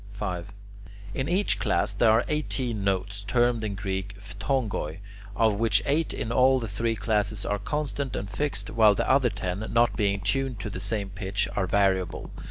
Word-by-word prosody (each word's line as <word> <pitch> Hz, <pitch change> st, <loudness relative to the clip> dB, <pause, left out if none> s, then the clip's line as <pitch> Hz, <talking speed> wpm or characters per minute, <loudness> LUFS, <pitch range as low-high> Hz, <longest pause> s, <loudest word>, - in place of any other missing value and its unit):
5. 90 Hz, -2 st, -4 dB, 0.6 s
In 130 Hz, +5 st, -2 dB
each 190 Hz, +4 st, +2 dB
class -, -, +1 dB
there 115 Hz, -, +3 dB
are 110 Hz, +2 st, +4 dB
eighteen 130 Hz, -8 st, -1 dB
notes, 100 Hz, +1 st, -1 dB
termed 120 Hz, +2 st, +2 dB
in 105 Hz, -2 st, -2 dB
Greek 95 Hz, 0 st, -4 dB
[Greek: -, -, -15 dB, 0.2 s
phthongoi], 110 Hz, -, -1 dB, 0.4 s
of 110 Hz, -1 st, +2 dB
which 115 Hz, -2 st, +3 dB
eight 150 Hz, +3 st, +1 dB
in 115 Hz, -, -3 dB
all 130 Hz, +2 st, +4 dB
the 115 Hz, -, -4 dB
three 115 Hz, +3 st, -1 dB
classes 105 Hz, 0 st, 0 dB
are 105 Hz, -, -1 dB
constant 140 Hz, +2 st, -3 dB
and 100 Hz, -, -3 dB
fixed, 105 Hz, -2 st, -3 dB
while 110 Hz, -2 st, +5 dB
the -, -, -1 dB
other 130 Hz, -2 st, +4 dB
ten, 95 Hz, -2 st, -3 dB
not 120 Hz, +1 st, +3 dB
being 100 Hz, -2 st, +1 dB
tuned 120 Hz, +4 st, 0 dB
to 105 Hz, -, -5 dB
the 90 Hz, -, -5 dB
same 100 Hz, 0 st, -2 dB
pitch, 100 Hz, 0 st, -1 dB
are 95 Hz, -2 st, 0 dB
variable. 95 Hz, -1 st, +1 dB
105 Hz, 180 wpm, -27 LUFS, 100-120 Hz, 0.6 s, while